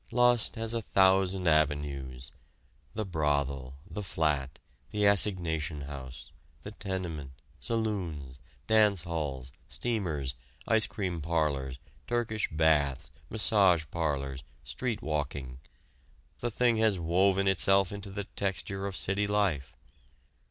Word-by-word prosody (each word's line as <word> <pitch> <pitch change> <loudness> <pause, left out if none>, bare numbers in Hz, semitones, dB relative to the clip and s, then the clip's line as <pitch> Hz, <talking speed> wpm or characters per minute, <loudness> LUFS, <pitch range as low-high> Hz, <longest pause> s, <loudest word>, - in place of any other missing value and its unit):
Lust 120 -1 +3
has 115 0 -2
a 115 - 0
thousand 95 -2 +3
avenues. 70 -5 0 0.6
The 110 0 -1
brothel, 70 -6 -1
the 105 - -5
flat, 75 -7 -1 0.3
the 105 -1 +1
assignation 85 -7 +2
house, 70 -2 -8 0.3
the - - -6
tenement, 85 -8 -4 0.3
saloons, 90 - -3 0.3
dance 105 -5 +4
halls, 70 -6 -3 0.2
steamers, 85 - -1 0.3
ice 110 -1 +4
cream 90 -5 -3
parlors, 75 -5 0 0.3
Turkish 115 -3 0
baths, 75 -4 +2 0.2
massage 100 -6 +4
parlors, 70 -4 -2 0.2
street 120 -4 -3
walking 70 -4 -3 0.8
the 120 - -1
thing 120 0 +2
has 110 -3 +3
woven 95 +3 +2
itself 95 0 +4
into 100 -1 -6
the 100 +1 -4
texture 100 0 -3
of 100 - -5
city 100 +4 0
life. 100 -10 +1
85 Hz, 110 wpm, -30 LUFS, 75-100 Hz, 0.8 s, dance